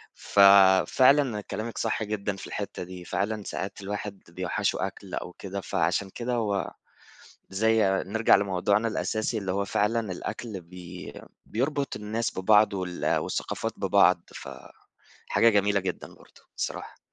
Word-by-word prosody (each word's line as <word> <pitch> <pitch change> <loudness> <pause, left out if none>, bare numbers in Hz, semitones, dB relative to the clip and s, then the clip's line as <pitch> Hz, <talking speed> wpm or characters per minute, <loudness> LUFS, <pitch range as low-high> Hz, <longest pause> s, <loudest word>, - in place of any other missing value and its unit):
ففعلًا 100 +6 +5
كلامِك 110 +3 -6
صح 110 0 -1
جدًا 105 -1 -3
في 95 - -9
الحتَّة - - -5
دي، 90 0 -9
فعلًا 100 +5 -2
ساعات 100 +1 -5
الواحد 100 0 -5
بيوحِّشه 90 +1 -1
أكل - - -12
أو 90 - -5
كده. 100 +1 -6
فعشان 95 +1 0
كده 120 +5 -4
هو 105 -6 -1 0.8
زي 110 +3 +2 0.2
نرجع 110 +3 +4
لموضوعنا 100 +3 +1
الأساسي، 110 0 -1
اللي 95 -3 -3
هو 100 +1 0
فعلًا 105 0 0
الأكل 100 +2 -6
بي 90 +1 -10 0.3
بيربط 140 +4 -2
الناس 110 +1 -3
ببعض 105 +2 +4
وال 90 -2 -1
والثقافات - - -3
ببعض. - - +4
ف - - -8 0.8
حاجة 115 - +4
جميلة 100 -1 +2
جدًا 95 -2 -4
برضه - - -20 0.2
الصراحة. - - -5
100 Hz, 135 wpm, -27 LUFS, 95-110 Hz, 0.8 s, ففعلًا